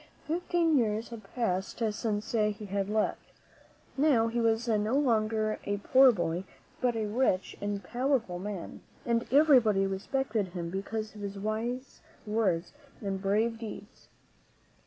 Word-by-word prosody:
Fifteen 335 Hz, -2 st, +2 dB
years 220 Hz, 0 st, -1 dB
had 230 Hz, -2 st, -8 dB
passed 190 Hz, -6 st, -1 dB, 0.2 s
since 210 Hz, -1 st, -2 dB
he 210 Hz, -1 st, 0 dB
had 200 Hz, 0 st, -2 dB
left. 215 Hz, 0 st, -1 dB, 0.6 s
Now 265 Hz, -6 st, +3 dB
he 235 Hz, +1 st, -1 dB
was 225 Hz, +1 st, +1 dB
no 215 Hz, +2 st, +1 dB
longer 220 Hz, -5 st, +1 dB
a 205 Hz, 0 st, -1 dB
poor 260 Hz, +5 st, +6 dB
boy, 175 Hz, -3 st, -2 dB, 0.4 s
but 245 Hz, -2 st, +2 dB
a 220 Hz, -1 st, -1 dB
rich 210 Hz, -3 st, 0 dB
and 205 Hz, -1 st, -3 dB
powerful 240 Hz, -4 st, 0 dB
man, 195 Hz, -2 st, -6 dB, 0.2 s
and 235 Hz, -1 st, 0 dB
everybody 255 Hz, -9 st, +5 dB
respected 210 Hz, +2 st, -1 dB
him 170 Hz, -2 st, -4 dB
because 215 Hz, +3 st, -4 dB
of 210 Hz, -, -10 dB
his 200 Hz, 0 st, -5 dB
wise 225 Hz, +6 st, -3 dB, 0.2 s
words 205 Hz, -6 st, 0 dB, 0.3 s
and 195 Hz, -2 st, -3 dB
brave 220 Hz, +4 st, +1 dB
deeds. 215 Hz, -1 st, -9 dB
215 Hz, 135 wpm, -30 LUFS, 200-240 Hz, 0.6 s, poor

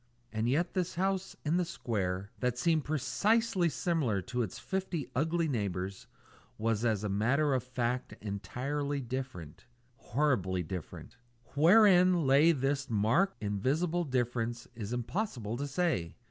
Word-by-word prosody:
And 110 Hz, +2 st, 0 dB
yet 160 Hz, +7 st, +1 dB
this 185 Hz, -2 st, -1 dB
house 190 Hz, +1 st, -1 dB
in 160 Hz, +4 st, +2 dB
the 180 Hz, -, +2 dB
square, 100 Hz, -, -3 dB
that 125 Hz, 0 st, 0 dB
seemed 160 Hz, +3 st, +2 dB
precisely 190 Hz, -, +1 dB
similar 150 Hz, -, 0 dB
to 125 Hz, -1 st, -2 dB
its 110 Hz, -6 st, -3 dB
fifty 190 Hz, -6 st, -3 dB
ugly 160 Hz, +5 st, +1 dB
neighbours, 100 Hz, -, -3 dB, 0.5 s
was 110 Hz, 0 st, 0 dB
as 110 Hz, -3 st, +1 dB
a -, -, 0 dB
matter 130 Hz, +9 st, +2 dB
of 130 Hz, -, +1 dB
fact 125 Hz, 0 st, -2 dB
entirely 125 Hz, +9 st, -3 dB
different 125 Hz, -, -6 dB, 0.3 s
horribly 105 Hz, -9 st, 0 dB
different. 90 Hz, +7 st, -7 dB, 0.4 s
Wherein 180 Hz, +1 st, +6 dB
lay 140 Hz, +5 st, +6 dB
this 140 Hz, -1 st, -1 dB
marked, 115 Hz, -, +1 dB
invisible 145 Hz, -, 0 dB
difference 120 Hz, -4 st, -2 dB
is 110 Hz, -3 st, -6 dB
impossible 120 Hz, -, -2 dB
to 145 Hz, +2 st, -3 dB
say. 140 Hz, -, -1 dB
130 Hz, 130 wpm, -31 LUFS, 110-165 Hz, 0.5 s, Wherein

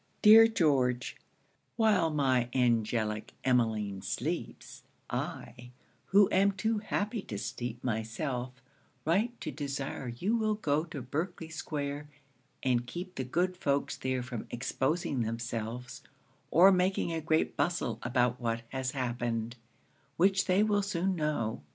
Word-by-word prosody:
'Dear 225 Hz, +1 st, +10 dB
George, 135 Hz, -, +1 dB, 0.6 s
'While 215 Hz, -7 st, +3 dB
my 130 Hz, -5 st, +1 dB
angelic 110 Hz, -3 st, +1 dB
Emmeline 110 Hz, -6 st, +1 dB
sleeps, 135 Hz, -, -4 dB, 0.3 s
I, 120 Hz, 0 st, -5 dB, 0.4 s
who 200 Hz, 0 st, +6 dB
am 200 Hz, +1 st, +4 dB
too 220 Hz, +2 st, 0 dB
happy 210 Hz, +1 st, -2 dB
to 105 Hz, -, -6 dB
sleep 120 Hz, +3 st, -5 dB
myself, 120 Hz, +3 st, -2 dB, 0.5 s
write 215 Hz, +9 st, +1 dB
to -, -, -3 dB
desire 140 Hz, -2 st, -4 dB
you 175 Hz, -, -1 dB
will 215 Hz, -2 st, +1 dB
go 155 Hz, -6 st, 0 dB
to 155 Hz, -6 st, -7 dB
Berkley 160 Hz, +5 st, -4 dB
square 145 Hz, -2 st, -4 dB, 0.5 s
and 125 Hz, -2 st, +1 dB
keep 180 Hz, +6 st, -6 dB
the 130 Hz, -, -3 dB
good 175 Hz, +8 st, 0 dB
folks 140 Hz, -5 st, 0 dB
there 130 Hz, -1 st, -2 dB
from 120 Hz, -3 st, -6 dB
exposing 135 Hz, +3 st, -1 dB
themselves, 115 Hz, +1 st, -4 dB, 0.5 s
or 185 Hz, +4 st, +7 dB
making 185 Hz, -2 st, +1 dB
a 165 Hz, -, -2 dB
great 155 Hz, 0 st, +1 dB
bustle 175 Hz, -, -1 dB
about 125 Hz, 0 st, +1 dB
what 115 Hz, -1 st, -1 dB
has 130 Hz, -1 st, -3 dB
happened, 120 Hz, -3 st, -2 dB, 0.6 s
which 195 Hz, +2 st, +3 dB
they 190 Hz, +2 st, +3 dB
will 205 Hz, -1 st, +2 dB
soon 190 Hz, -1 st, -1 dB
know. 150 Hz, -, -1 dB
140 Hz, 130 wpm, -31 LUFS, 120-180 Hz, 0.6 s, Dear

